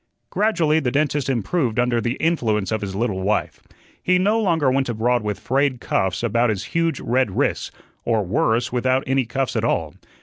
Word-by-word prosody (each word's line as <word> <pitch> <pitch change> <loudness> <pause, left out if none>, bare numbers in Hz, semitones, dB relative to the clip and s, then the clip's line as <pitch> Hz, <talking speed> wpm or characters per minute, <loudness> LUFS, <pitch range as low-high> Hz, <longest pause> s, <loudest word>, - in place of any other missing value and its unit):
Gradually 170 -8 +2
the 130 - -1
dentist 145 0 0
improved 125 - -1
under 120 -1 +1
the 120 +1 -1
influence 115 - 0
of 110 - -1
his 95 -2 -5
little 100 -3 -1
wife. 105 +2 -1 0.4
He 180 0 +2
no 210 +5 +2
longer 165 -9 +2
went 135 -1 0
abroad 120 +1 +1
with 105 -1 -3
frayed 135 -1 0
cuffs 95 0 -1
about 120 +1 +2
his 100 -3 -2
huge 165 -1 +1
red 125 -4 0
wrists - - 0 0.3
or 110 -2 +1
worse, 120 - +1
without 130 +1 +1
any 135 -2 0
cuffs 135 +1 -2
at - - 0
all. - - 0
125 Hz, 180 wpm, -21 LUFS, 110-145 Hz, 0.4 s, Gradually